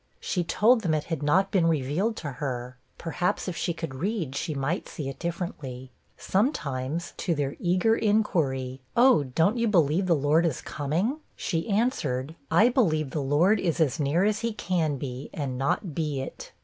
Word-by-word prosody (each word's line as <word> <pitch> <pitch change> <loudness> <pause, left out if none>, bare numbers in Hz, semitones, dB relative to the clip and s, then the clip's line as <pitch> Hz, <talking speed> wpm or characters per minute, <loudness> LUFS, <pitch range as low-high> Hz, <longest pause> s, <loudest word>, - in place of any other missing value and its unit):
She 180 - -1
told 225 +8 +3
them 165 -6 +1
it 150 - -1
had 160 - -3
not 185 +7 +2
been 185 -5 +3
revealed 165 - 0
to 150 -7 -5
her; 125 -2 -4 0.2
perhaps, 175 +3 -1
if 180 - -3
she 170 - -1
could 165 -4 -5
read, 165 - -2
she 150 +2 -2
might 140 +6 -2
see 150 -5 -5
it 135 - -8
differently. 150 -7 -5 0.3
Sometimes, 170 - -1
to 170 - 0
their 145 -1 -2
eager 185 +6 +2
inquiry, 140 - 0 0.2
'Oh, 240 - +6
don't 165 - +1
you 230 - +2
believe 175 -2 +3
the 170 - +4
Lord 150 +3 +3
is 160 -6 0
coming?' 170 - -2 0.2
she 165 +5 -2
answered, 160 - 0 0.2
'I 210 +9 +5
believe 155 - +1
the 150 - -2
Lord 160 +10 +3
is 170 -3 -1
as 155 -4 +2
near 150 +5 +2
as 210 +1 +2
he 230 -1 -2
can 170 -8 -1
be, 130 0 -6
and 140 -4 -3
not 140 +6 -1
be 150 -3 -2
it.' 135 - -8
165 Hz, 180 wpm, -27 LUFS, 140-190 Hz, 0.3 s, Oh